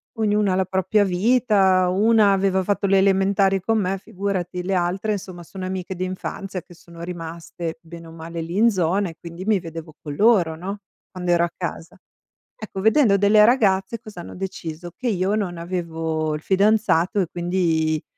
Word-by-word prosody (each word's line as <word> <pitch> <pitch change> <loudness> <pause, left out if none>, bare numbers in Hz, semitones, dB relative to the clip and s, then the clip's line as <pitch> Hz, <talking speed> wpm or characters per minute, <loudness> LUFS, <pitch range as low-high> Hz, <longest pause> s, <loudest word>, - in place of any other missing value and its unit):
Ognuna 210 -2 +1
ha - - +1
la 190 0 +1
propria 190 +3 +1
vita, 190 -2 +3
una 205 +2 +4
aveva 190 -1 +1
fatto 200 +1 0
le 195 0 +4
elementari 195 0 +3
con 225 +2 +1
me, 195 0 -1
figurati, 190 -3 -3
le 190 +2 -2
altre 190 +4 0
somma 180 -2 -9
sono 185 +2 -8
amiche 185 0 -4
d'infanzia 185 +1 -5
che 175 - -17
sono 170 0 -14
rimaste 170 -1 -6
bene 165 0 -11
o - - -12
male 165 +1 -7
lì 170 +4 -5
in 230 +2 +5
zona 190 0 +1
e 165 - -8
quindi 170 +3 -9
mi 215 -3 +3
vedevo 165 -2 -9
con 145 -2 -6
loro, 185 -7 +3
no, 195 +4 -5 0.3
quando 180 -2 -3
ero 170 0 +4
a 170 - -6
casa. 170 -2 -6 0.6
Ecco, 210 -3 -7
vedendo 220 -1 +4
delle 210 +1 +5
ragazze 220 -2 +2
cosa 215 -6 -10
hanno - - -10
deciso? 175 -3 -6
Che 255 - -3
io 195 -1 +1
non 180 -5 -2
avevo 165 -3 -2
il 150 - -4
fidanzato 200 -1 +2
e 180 - +1
quindi 170 -3 0
185 Hz, 180 wpm, -22 LUFS, 170-200 Hz, 0.6 s, in